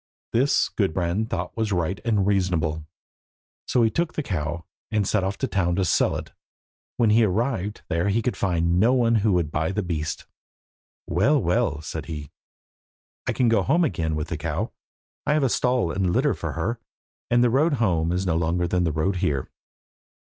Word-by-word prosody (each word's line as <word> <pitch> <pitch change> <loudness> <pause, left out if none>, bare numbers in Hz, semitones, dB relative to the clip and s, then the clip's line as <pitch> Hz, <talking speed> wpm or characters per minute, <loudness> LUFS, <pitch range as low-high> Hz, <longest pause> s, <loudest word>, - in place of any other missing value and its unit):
This 130 +5 +3
Gudbrand 95 +2 -1
thought 90 -1 -3
was 110 -2 -1
right 90 0 -1
and 105 -4 +1
reasonable, 85 -6 0 0.8
so 120 - +3
he 110 - +3
took 170 +4 -1
the 155 - -1
cow, 85 - -3 0.2
and 105 -4 0
set 105 -3 +1
off 95 +1 -2
to 135 - -1
town 90 -6 0
to 95 0 +1
sell - - +2
it. - - -6 0.7
When 115 -3 +3
he 115 +2 +5
arrived 105 0 -1
there 85 +3 0
he 110 +3 +1
could 125 - -1
find 85 -2 +1
no 115 +6 +4
one 115 -3 +3
who 105 -1 +2
would 85 -4 0
buy 80 +3 0
the 105 +1 -1
beast. 80 -3 -3 0.8
"Well, 135 - +2
well," 110 - 0
said 80 0 -6
he, 75 -4 -6 1.0
"I - - +1
can 125 - +2
go 115 -3 +3
home 165 - +2
again 80 - -1
with 75 -1 -3
the - - -3
cow. - - -3 0.6
I - - +3
have 140 -5 +2
stall 125 -9 +1
and 95 -1 0
litter - - +2
for - - -4
her, 115 +3 -2 0.5
and 120 0 +4
the 120 - +3
road 150 +6 +3
home 90 - +1
is 90 +2 -1
no 85 -3 +1
longer 85 +2 0
than 90 0 +1
the 80 - +1
road 80 +6 0
here." 75 -8 -1
95 Hz, 190 wpm, -24 LUFS, 85-115 Hz, 1.0 s, he